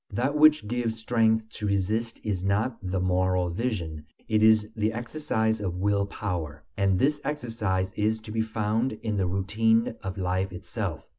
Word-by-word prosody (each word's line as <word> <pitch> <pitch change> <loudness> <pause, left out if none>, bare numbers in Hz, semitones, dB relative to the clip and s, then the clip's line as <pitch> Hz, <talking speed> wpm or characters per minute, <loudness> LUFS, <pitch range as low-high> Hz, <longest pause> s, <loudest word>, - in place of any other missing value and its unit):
That 130 +5 -1
which 150 -6 +5
gives 115 -1 -1
strength 110 -1 +2
to 105 - -4
resist 105 +4 0
is 100 -4 -2
not 105 +5 +1
the 95 -1 -2
moral 90 -1 +1
vision, 85 -8 -3 0.2
it 110 -1 +2
is 110 -1 +5
the 110 0 +1
exercise 115 -2 -1
of 90 -4 -2
will 100 +1 +1
power; 85 -8 -4
and 100 -2 +2
this 145 +6 +2
exercise 110 -9 -2
is 110 +1 +1
to 110 0 -9
be 110 +1 0
found 110 +2 0
in 110 -2 -1
the 95 -2 +1
routine 110 +5 +2
of 95 +1 -5
life 95 +1 -1
itself. 90 - -5
105 Hz, 165 wpm, -27 LUFS, 95-115 Hz, 0.2 s, which